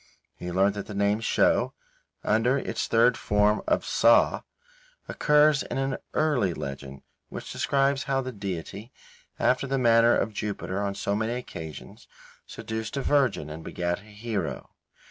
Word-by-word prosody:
He 90 - -6
learnt 95 +3 +3
that 100 0 -6
the 105 - -7
name 100 +1 +1
Sho, 115 - +2 0.5
under 115 +5 +2
its - - -3
third 115 +2 +4
form 105 +1 +2
of - - +1
Psa, - - +4 0.6
occurs 150 -1 +3
in - - -5
an 135 0 -1 0.2
early 130 - +1
legend 70 0 -7 0.3
which - - -7
describes 135 -1 +1
how 135 -2 0
the 130 0 -5
deity, 100 +2 -6 0.5
after 130 +2 +1
the 135 0 0
manner 115 -1 +5
of 110 - -1
Jupiter 100 -2 -3
on 100 -1 -2
so 100 - -1
many 110 +2 -1
occasions, 80 - -8 0.4
seduced 110 +3 -5
a 135 - -1
Virgin 130 - +1
and 80 +1 -8
begat 85 +2 -2
a 105 - -18
hero. 105 -5 -5
110 Hz, 150 wpm, -26 LUFS, 100-130 Hz, 0.6 s, manner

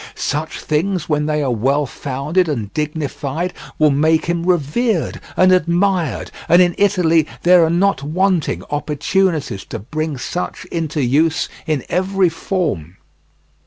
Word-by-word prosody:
Such 150 +2 -3
things 170 +3 -1
when 150 -1 0
they 150 -1 0
are 130 - 0
well 135 +6 +1
founded 145 +7 -1
and 110 -8 -3
dignified 150 +2 -3 0.2
will 155 -1 +4
make 155 +3 +2
him 170 0 -1
revered 180 - 0 0.2
and 185 0 +5
admired, 180 -1 +1 0.2
and 175 - +6
in 175 -1 +4
Italy 175 -6 +3 0.2
there 180 -1 +6
are 160 - +2
not 185 0 +2
wanting 175 +3 0
opportunities 150 - 0
to - - -6
bring 155 +6 -4
such 180 +8 -4
into 160 -3 -2
use 155 +6 +2 0.2
in 150 -5 0
every 190 0 +1
form. 155 - -3
160 Hz, 135 wpm, -18 LUFS, 145-180 Hz, 0.2 s, and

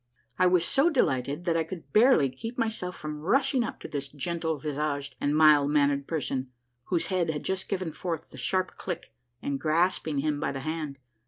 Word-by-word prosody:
I 185 - +6
was 180 -1 +3
so 280 - +3
delighted 145 - 0
that 170 -2 +2
I 165 - +2
could 160 -4 -9
barely 225 - +6
keep 225 - -7
myself 220 -6 -2
from 150 -2 -5
rush 270 - +2
ing 255 -3 +3
up 225 - -5
to - - -6
this 140 -2 -4
gentle 160 +3 -2
visaged 145 -1 -3
and 145 +1 +1
mild 150 -2 +6
mannered 140 -1 +2
person, 135 -5 -2 0.4
whose 175 -3 +1
head 175 -3 +1
had 150 -2 -2
just 190 -1 -2
given 185 -4 -2
forth 165 -1 -5
the - - -11
sharp 185 +7 -1
click, 175 -9 -5 0.3
and 140 -1 -2
grasping 160 -1 +1
him 145 +1 0
by 140 - -1
the 135 - -4
hand. 155 -1 -4
155 Hz, 195 wpm, -28 LUFS, 145-180 Hz, 0.4 s, I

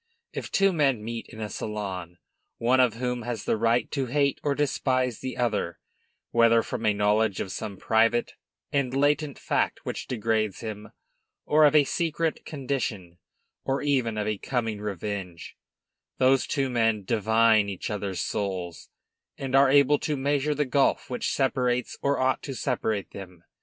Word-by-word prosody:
If - - -5
two 195 -1 +3
men 135 -9 +1
meet 115 +1 -5
in 110 - -11
a 110 - -3
salon, 95 -5 -5 0.4
one 125 +3 +2
of 125 -4 +4
whom 125 0 -2
has 115 -2 -4
the - - +2
right 115 +2 +1
to 135 -3 -1
hate 140 +2 +1
or 145 -1 0
despise 130 -4 0
the 130 - -5
other, 105 -8 -1 0.5
whether 115 -1 +4
from 110 - -3
a 105 - +4
knowledge 105 0 +2
of 95 - -3
some 100 0 -5
private 115 +3 +2 0.4
and 135 -2 0
latent 145 +1 +1
fact - - -1
which - - -4
degrades 110 -3 -1
him, 105 -2 -6 0.6
or 155 0 +5
of 150 +1 +4
a 150 - +7
secret 165 +2 -1
condition, 120 - -4 0.4
or 135 +1 -1
even 130 -6 +1
of 105 - -1
a 105 -2 -2
coming 115 -5 -2
revenge, 100 -3 -5 0.6
those 130 0 +3
two 135 -1 0
men 115 -3 +1
divine 110 0 +3
each 95 +1 -5
other's 100 -3 -3
souls, 90 -5 -4 0.5
and 135 -1 -2
are 135 0 +6
able 145 +1 +5
to 150 -2 -2
measure 145 +2 0
the 150 +1 +1
gulf 135 0 +1
which 125 - -1
separates 125 -2 0
or 140 0 +1
ought 130 0 +1
to 135 - -6
separate 110 -2 -2
them. 90 -3 -10
115 Hz, 165 wpm, -26 LUFS, 105-135 Hz, 0.6 s, a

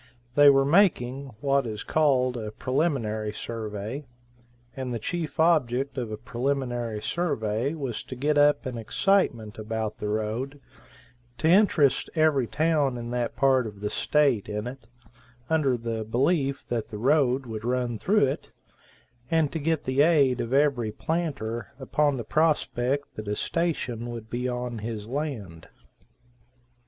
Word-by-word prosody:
They 145 +1 +8
were 135 -1 +5
making, 140 -6 +2
what 140 -2 +2
is 110 -1 -5
called 130 -5 +2
a 110 -3 -4
preliminary 120 -6 -1
survey, 110 +4 -5 0.7
and 130 -2 -4
the 120 - -1
chief 165 +3 -4
object 140 -5 +2
of 120 -5 -3
a 105 - -4
preliminary 120 -1 -2
survey 135 -3 -1
was 135 -7 -4
to 130 - -7
get 145 +4 0
up 145 +1 +4
an 125 -3 -4
excitement 115 - +1
about 110 0 -3
the 105 - -3
road, 110 +7 -2 0.8
to 160 - 0
interest 170 - +4
every 155 -6 +3
town 150 -4 +1
in 120 0 -6
that 120 -1 -2
part 130 -3 +3
of 105 -2 -10
the 105 - -2
state 140 -10 +2
in 105 +1 -3
it, 125 -2 -8 0.6
under 140 -6 +2
the 115 -1 -3
belief 135 +5 0
that 115 -2 -3
the 110 - -6
road 130 +2 +2
would 110 -2 -6
run 120 -2 -1
through 205 -5 +3
it, 135 - -4 0.8
and 160 -3 +2
to 165 - -3
get 160 0 0
the 130 +2 +2
aid 145 -5 +4
of 115 - -4
every 135 -5 +2
planter 135 -5 -3
upon 145 +1 +1
the 120 - -4
prospect 145 -3 0
that 110 -1 -6
a 105 - -1
station 125 -7 -2
would 115 -2 -8
be 125 +1 -1
on 125 -2 -3
his 110 -1 -5
land. 115 - -5
130 Hz, 150 wpm, -26 LUFS, 115-145 Hz, 0.8 s, They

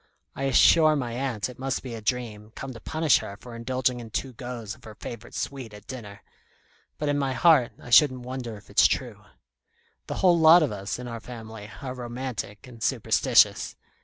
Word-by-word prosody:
I 135 - -3
assure 155 +3 +6
my 125 -5 -2
aunt 120 -4 -2
it 125 -1 -12
must 135 0 -2
be 125 -3 -6
a 115 - -6
dream, 110 -2 -3
come 135 -1 -6
to 115 - -10
punish 155 +3 +2
her 100 - -8
for 120 0 -10
indulging 125 +1 -1
in 115 -2 -9
two 130 +4 -3
goes 120 -3 -6
of - - -17
her 110 -1 -11
favourite 115 +1 -9
sweet 130 -6 -5
at 105 - -14
dinner; 105 -7 -9 0.7
but 150 - -2
in 145 0 +1
my 135 -2 0
heart 145 -5 +4
I 120 - -11
shouldn't 130 0 +6
wonder 125 -3 -6
if 100 - -16
it's - - +6
true. - - -4 0.8
The - - -4
whole 175 -2 +4
lot 160 +1 +8
of 145 - 0
us, 100 -1 -4
in 125 0 -7
our 115 -1 -5
family, 110 -3 -9
are 130 -2 -4
romantic 120 -3 -6
and 120 -3 -13
superstitious. - - +3
125 Hz, 195 wpm, -26 LUFS, 115-135 Hz, 0.8 s, lot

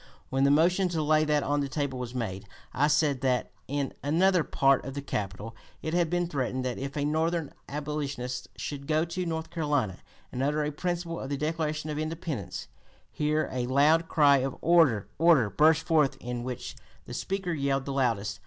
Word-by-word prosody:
When 135 +1 +2
the - - +5
motion 175 +6 +3
to 165 -3 -1
lay 155 +1 +3
that 150 -1 +2
on 145 +1 0
the 140 -1 -1
table 135 -2 -2
was 125 0 -5
made, 100 -5 -4 0.3
I 145 +3 +3
said 150 -3 +2
that, 130 -2 0 0.2
'In 140 0 -2
another 175 +4 +3
part 135 -1 +3
of 135 +1 -6
the 140 - -3
Capitol 105 -1 -4 0.3
it 160 - -3
had 175 -2 +2
been 175 +1 +1
threatened 130 -4 -2
that 125 -2 -2
if 140 +2 -5
a 145 - 0
Northern 160 +1 0 0.2
abolitionist 140 -4 -4
should 140 -1 -6
go 155 +1 +2
to 175 +1 -3
North 160 0 -3
Carolina, 145 - 0 0.3
and 125 - -3
utter 150 +2 +1
a 150 - -1
principle 170 +1 -3
of 135 - -5
the 140 - -1
Declaration 155 0 -2
of 150 - -3
Independence' 155 - -4 0.4
Here 155 +1 0
a 125 -1 -2
loud 150 +5 +4
cry 145 -4 +5
of 135 0 -2
'order! 160 - +4
order!' 155 -11 +5
burst 160 +1 +4
forth, 155 -5 +3
in 120 0 -4
which 125 -1 -5 0.3
the - - -8
Speaker 190 -2 -2
yelled 140 -2 0
the 140 - -3
loudest. 110 -7 0
145 Hz, 190 wpm, -28 LUFS, 130-160 Hz, 0.4 s, the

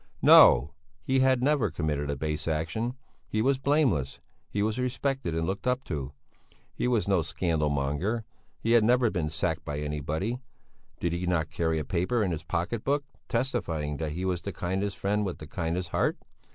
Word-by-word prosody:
No! 65 +5 +8 0.3
he 130 0 +2
had 130 -1 +3
never 140 -6 +3
committed 75 -3 -2
a 70 - 0
base 75 +3 -3
action; 85 +11 -1 0.3
he 110 - -2
was 130 +4 +2
blameless; 135 - +1 0.3
he 100 - -1
was 110 +3 -1
respected 125 - -1
and 80 0 0
looked 95 +7 -3
up 125 +1 +1
to; 70 - -4 0.6
he - - -1
was 120 -5 +1
no 95 -3 +3
scandal 80 -2 0
monger; 75 +11 -1 0.3
he 115 - -1
had 115 -2 +6
never 120 0 +4
been 80 -5 -1
sacked 80 +1 -1
by 75 -3 -4
anybody. 75 - -2 0.6
Did 85 -1 -1
he 90 +1 -2
not 80 -3 0
carry 80 -1 0
a 75 - -2
paper 95 - 0
in 95 - 0
his 80 -1 -3
pocket 90 +6 -2
book, 145 +1 +1 0.3
testifying 85 - -1
that 75 -1 -3
he 90 +4 -3
was 90 -2 -1
the 100 - -4
kindest 95 +3 -2
friend 105 +2 0
with 95 -3 -3
the 75 - -9
kindest 85 +3 -3
heart? - - +1
90 Hz, 185 wpm, -28 LUFS, 80-115 Hz, 0.6 s, No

